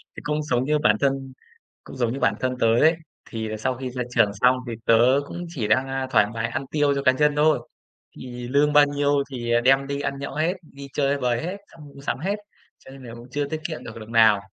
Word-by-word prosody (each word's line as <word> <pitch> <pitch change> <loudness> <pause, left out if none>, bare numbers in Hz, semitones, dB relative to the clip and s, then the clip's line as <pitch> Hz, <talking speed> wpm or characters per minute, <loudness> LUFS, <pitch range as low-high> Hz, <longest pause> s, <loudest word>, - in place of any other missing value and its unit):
Thì - - -8
cũng 150 0 -1
giống 130 -3 0
như 150 +1 +1
bản 110 -6 +4
thân 135 -1 -1 0.5
cũng - - -11
giống 120 -2 0
như 135 - -5
bản - - +2
thân 130 0 -2
tớ 115 - +3
ấy, 160 +2 +5 0.3
thì 110 -2 -4
sau 130 +3 -1
khi 130 -1 -5
ra 125 0 -3
trường 100 - +4
xong 125 +1 +5
thì 115 - -4
tớ 120 +4 +5
cũng 175 0 -6
chỉ 120 -11 -3
đang, 130 +5 +2
a, 135 0 -3
thoải 105 -3 +5
mái 115 0 -2
ăn 135 - -4
tiêu 145 -2 +2
cho 140 - -2
cá 130 - +6
nhân 150 +2 +2
thôi. 150 +1 +3 0.6
Thì 125 -1 -7
lương 145 +3 +2
bao 145 0 +7
nhiêu 145 0 +1
thì, 120 -2 -4
ờ, 120 0 +3
đem 135 +2 +3
đi 140 0 -3
ăn 140 -1 -3
nhậu 140 0 -6
hết, 160 +4 +1
đi 140 -3 -12
chơi 140 0 +1
bời 125 -2 0
hết, 185 +4 -4
xong 155 -3 -14
mua 140 -1 -14
sắm 140 - -3
hết, 195 +7 -1 0.4
cho - - -15
nên 135 -1 -12
là 115 -2 -9
cũng 120 +2 -12
chưa 145 0 -1
tiết 155 +2 -4
kiệm 160 - -7
được 115 0 -9
đồng 110 +1 -11
nào. 110 -3 +5
135 Hz, 255 wpm, -23 LUFS, 120-145 Hz, 0.6 s, bao